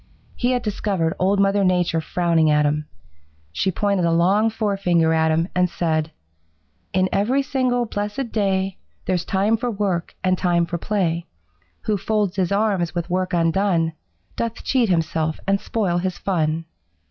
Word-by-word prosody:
He 250 Hz, +1 st, +1 dB
had 245 Hz, -1 st, -1 dB
discovered 195 Hz, -6 st, -1 dB
Old 195 Hz, +2 st, +2 dB
Mother 200 Hz, 0 st, +3 dB
Nature 180 Hz, -3 st, +2 dB
frowning 165 Hz, -2 st, +1 dB
at 150 Hz, 0 st, +3 dB
him. 150 Hz, +1 st, -1 dB, 0.6 s
She 190 Hz, -, 0 dB
pointed 200 Hz, 0 st, 0 dB
a 170 Hz, -, +2 dB
long 190 Hz, +7 st, +3 dB
forefinger 195 Hz, -7 st, +1 dB
at 160 Hz, 0 st, +2 dB
him 165 Hz, +2 st, +1 dB
and 180 Hz, 0 st, +2 dB
said: 160 Hz, -2 st, -1 dB, 0.8 s
'In 185 Hz, 0 st, +2 dB
every 250 Hz, +8 st, +1 dB
single 255 Hz, -2 st, 0 dB
blessed 210 Hz, +3 st, -4 dB
day 195 Hz, -3 st, 0 dB, 0.3 s
There's 180 Hz, -1 st, 0 dB
time 200 Hz, +5 st, +1 dB
for 245 Hz, +2 st, -2 dB
work 195 Hz, -6 st, -2 dB
and 185 Hz, -1 st, +1 dB
time 175 Hz, -1 st, +2 dB
for 170 Hz, 0 st, -4 dB
play. 170 Hz, -5 st, -1 dB, 0.5 s
Who 210 Hz, -1 st, 0 dB
folds 205 Hz, -1 st, -1 dB
his 185 Hz, -1 st, 0 dB
arms 200 Hz, -5 st, +1 dB
with 175 Hz, 0 st, -3 dB
work 185 Hz, 0 st, 0 dB
undone 165 Hz, -1 st, +1 dB, 0.4 s
Doth 230 Hz, 0 st, -3 dB
cheat 250 Hz, -5 st, +2 dB
himself 160 Hz, -2 st, 0 dB
and 195 Hz, 0 st, +1 dB
spoil 190 Hz, -6 st, 0 dB
his 185 Hz, 0 st, -2 dB
fun.' 165 Hz, -3 st, -1 dB
185 Hz, 160 wpm, -22 LUFS, 170-205 Hz, 0.8 s, Mother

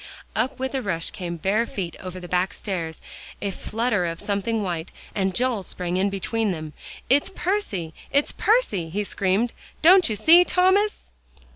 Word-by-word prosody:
Up 260 Hz, 0 st, 0 dB
with 265 Hz, +1 st, -3 dB
a 265 Hz, -, -1 dB
rush 170 Hz, -7 st, -2 dB
came 170 Hz, -2 st, -5 dB
bare 210 Hz, +7 st, +1 dB
feet 175 Hz, -5 st, -4 dB
over 185 Hz, 0 st, -7 dB
the 180 Hz, -, -8 dB
back 180 Hz, +1 st, 0 dB
stairs; 170 Hz, -6 st, -4 dB, 0.4 s
a 200 Hz, -, -2 dB
flutter 215 Hz, -2 st, -1 dB
of 165 Hz, 0 st, -4 dB
something 210 Hz, +2 st, -1 dB
white, 175 Hz, -3 st, -3 dB, 0.2 s
and 190 Hz, -2 st, 0 dB
Joel 245 Hz, -4 st, +1 dB
sprang 180 Hz, -1 st, -3 dB
in 195 Hz, +2 st, +2 dB
between 205 Hz, +2 st, -1 dB
them. 155 Hz, -3 st, -5 dB, 0.3 s
"It's 285 Hz, +7 st, +3 dB
Percy 345 Hz, -, -2 dB, 0.2 s
it's 285 Hz, +1 st, +3 dB
Percy!" 305 Hz, -, +1 dB
he 205 Hz, +5 st, -1 dB
screamed, 200 Hz, +4 st, 0 dB, 0.3 s
"don't 360 Hz, -2 st, +7 dB
you 215 Hz, -, -1 dB
see, 335 Hz, -, +7 dB
Thomas?" 375 Hz, +4 st, +2 dB
200 Hz, 165 wpm, -24 LUFS, 180-260 Hz, 0.4 s, don't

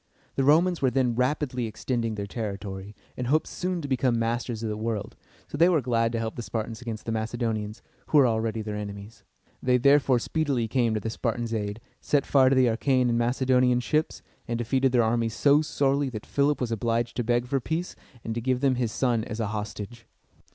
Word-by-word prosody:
The 135 Hz, -, 0 dB
Romans 165 Hz, +5 st, +4 dB
were 130 Hz, -, +4 dB
then 125 Hz, -1 st, +1 dB
rapidly 125 Hz, -1 st, 0 dB
extending 115 Hz, 0 st, -2 dB
their 100 Hz, -1 st, -4 dB
territory, 100 Hz, -2 st, -6 dB, 0.2 s
and 125 Hz, -, -3 dB
hoped 155 Hz, +4 st, +2 dB
soon 180 Hz, -2 st, -3 dB
to -, -, -3 dB
become 130 Hz, -2 st, +1 dB
masters 115 Hz, 0 st, -2 dB
of 110 Hz, -, -1 dB
the 105 Hz, -, -2 dB
world, 110 Hz, -1 st, -3 dB, 0.3 s
so 145 Hz, -, -6 dB
they 170 Hz, +2 st, +6 dB
were 170 Hz, -4 st, +3 dB
glad 115 Hz, -3 st, +1 dB
to -, -, 0 dB
help 115 Hz, 0 st, -3 dB
the -, -, -4 dB
Spartans 115 Hz, 0 st, -4 dB
against 115 Hz, -3 st, -6 dB
the 115 Hz, -, -2 dB
Macedonians, 110 Hz, -1 st, -3 dB, 0.2 s
who 155 Hz, -, +3 dB
were 140 Hz, -, +7 dB
already 110 Hz, -1 st, 0 dB
their 105 Hz, -1 st, -4 dB
enemies. 105 Hz, +1 st, -7 dB, 0.4 s
They 125 Hz, 0 st, +3 dB
therefore 140 Hz, 0 st, +4 dB
speedily 135 Hz, -2 st, -1 dB
came 115 Hz, -1 st, +1 dB
to -, -, 0 dB
the 110 Hz, +2 st, -4 dB
Spartans' 115 Hz, 0 st, -2 dB
aid, 105 Hz, -1 st, -3 dB, 0.2 s
set 145 Hz, -2 st, +1 dB
fire 135 Hz, -2 st, +5 dB
to 135 Hz, -, +3 dB
the 130 Hz, -1 st, +5 dB
Achæan 125 Hz, +2 st, +2 dB
and 115 Hz, -, +1 dB
Macedonian 125 Hz, 0 st, +2 dB
ships, 150 Hz, +7 st, -1 dB, 0.2 s
and 120 Hz, -1 st, -1 dB
defeated 130 Hz, +3 st, +1 dB
their 120 Hz, -2 st, +4 dB
armies 115 Hz, 0 st, 0 dB
so 145 Hz, +1 st, +4 dB
sorely, 140 Hz, -2 st, 0 dB
that 110 Hz, -4 st, -7 dB
Philip 145 Hz, +1 st, +1 dB
was 125 Hz, -2 st, -2 dB
obliged 115 Hz, +1 st, -1 dB
to 120 Hz, -, 0 dB
beg 120 Hz, +1 st, +1 dB
for 135 Hz, +2 st, 0 dB
peace 160 Hz, +7 st, -3 dB, 0.3 s
and 115 Hz, -, -3 dB
to 120 Hz, -, -3 dB
give 130 Hz, +1 st, 0 dB
them 135 Hz, -3 st, +2 dB
his 120 Hz, -3 st, -1 dB
son 120 Hz, -2 st, +1 dB
as 110 Hz, -, -6 dB
a 110 Hz, -3 st, -1 dB
hostage. 110 Hz, +2 st, -6 dB
120 Hz, 210 wpm, -26 LUFS, 110-130 Hz, 0.4 s, were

